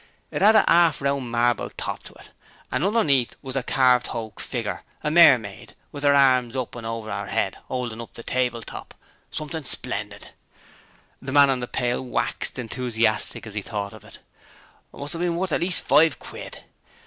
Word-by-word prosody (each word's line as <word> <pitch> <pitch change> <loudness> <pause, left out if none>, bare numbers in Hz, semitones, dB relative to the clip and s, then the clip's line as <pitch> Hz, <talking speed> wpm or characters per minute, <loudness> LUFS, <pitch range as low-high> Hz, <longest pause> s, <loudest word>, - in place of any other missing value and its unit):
It - - -3
'ad 215 +3 +6
a 215 - +7
'arf 170 -2 +4
round 140 -3 -1
marble 120 0 +1
top - - -4
to - - -10
it, - - -16 0.4
and - - 0
underneath 155 - +2
was 130 -1 -6
a 135 - +1
carved 125 -1 +3
hoak 110 -2 -6
figger, - - -4 0.2
a 150 - 0
mermaid, 120 - +4 0.2
with 145 -1 -8
'er 140 0 +5
arms 130 -3 +4
up 130 -2 -3
over 115 -2 -5
'er 100 0 -4
'ead - - -1
'oldin' 120 -3 -4
up 115 - -11
the 115 - -9
table 125 -2 -1
top - - -10 0.3
something 155 +1 -5
splendid!' - - -5 0.9
The 135 - -6
man 140 0 +6
on 130 - -1
the 120 - -4
pail 125 +1 -1
waxed 125 - -1
enthusiastic 115 -3 0
as 110 - -8
he 105 - -3
thought 100 -1 -5
of - - -13
it. - - -14 0.7
'Must 145 +1 -5
'ave 170 +1 -3
been 170 -1 0
worth 180 +1 -2
at - - 0
least 180 +1 0
five 160 -2 +5
quid. - - -9
130 Hz, 185 wpm, -24 LUFS, 115-145 Hz, 0.9 s, a